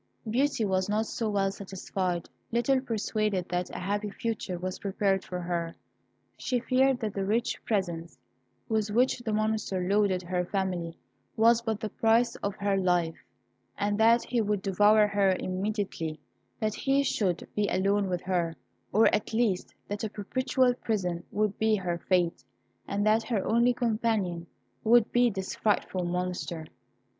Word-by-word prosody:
Beauty 245 0 +1
was 190 0 0
not 215 +2 +1
so 225 0 -2
well 195 -1 +1
satisfied. 185 -2 -3 0.2
Little 255 +3 +2
persuaded 215 -5 -1
that 180 0 -1
a - - -7
happy 205 +3 -2
future 205 -3 -3
was 185 +1 -4
prepared 195 -1 0
for 180 - -5
her, 170 -1 -3 0.6
she 250 -1 -1
feared 255 +2 +2
that 215 -3 -2
the 195 - -2
rich 225 +5 0
presents 175 -6 -2 0.5
with 220 -1 0
which 245 +5 +2
the 240 -2 -3
Monster 215 -4 0
loaded 200 -2 +2
her 180 0 -1
family 180 -3 -2 0.4
was 230 +1 +5
but 220 -2 -2
the 215 -1 -3
price 230 +2 +2
of 200 0 -3
her 200 -1 0
life, 175 -3 0 0.5
and 205 +1 0
that 230 +2 +5
he 240 -2 0
would 205 -2 -1
devour 210 +2 +5
her 200 -2 +2
immediately 185 -4 -3 0.4
that 215 -1 0
he 275 +4 +1
should 190 -9 0
be 210 -1 +1
alone 200 +1 +1
with 180 -1 -1
her, 175 -3 0 0.4
or 220 +2 +5
at 215 - -1
least 220 -6 +1 0.2
that 205 +1 -4
a 220 - -1
perpetual 255 +5 +1
prison 180 -8 -2
would 210 -1 -1
be 220 0 +3
her 175 -4 -2
fate, 175 -2 +1 0.4
and 205 +1 -1
that 215 +1 +4
her 220 -3 -2
only 235 +2 +4
companion 215 -8 -1 0.4
would 230 0 +5
be 245 0 +4
this 190 -3 -4
frightful 195 -3 0
Monster. 180 -2 -3
205 Hz, 155 wpm, -28 LUFS, 185-225 Hz, 0.6 s, was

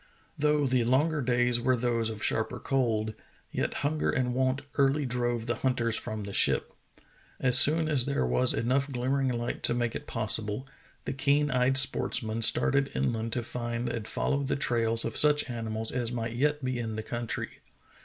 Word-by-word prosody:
Though 150 -2 +1
the 130 -2 +1
longer 145 +6 +1
days 125 -1 +2
were 130 +1 +2
those 115 -2 0
of 110 -1 -6
sharper 115 +3 0
cold, 115 -5 -1 0.4
yet - - -2
hunger 150 +1 0
and 125 -1 0
want 130 +2 0 0.2
early 140 +1 +2
drove 120 -2 -2
the 120 -1 -2
hunters 120 -3 0
from 110 -1 -3
the 100 0 -7
ship. - - +1 0.7
As 125 -1 +6
soon 160 +2 +5
as 140 -5 +3
there 140 - 0
was 90 - +4
enough 130 +5 0
glimmering 135 +2 -1
light 120 -1 -3
to 120 - +3
make 120 -1 -1
it - - -7
possible, 110 +2 -1 0.4
the - - -3
keen 145 +2 +1
eyed 125 +1 +3
sportsmen 115 -4 +1
started 135 +4 +3
inland 115 -1 -1
to 120 - -1
find 120 0 -4
and 115 -2 -5
follow 140 - -1
the 140 0 -1
trails 115 -4 0
of 115 - -4
such 150 0 +2
animals 110 -1 -3
as 120 -2 -2
might 115 -1 -4
yet 145 +2 0
be 130 -1 -2
in 110 -2 -4
the 110 - -4
country. 120 0 -5
125 Hz, 180 wpm, -28 LUFS, 115-135 Hz, 0.7 s, As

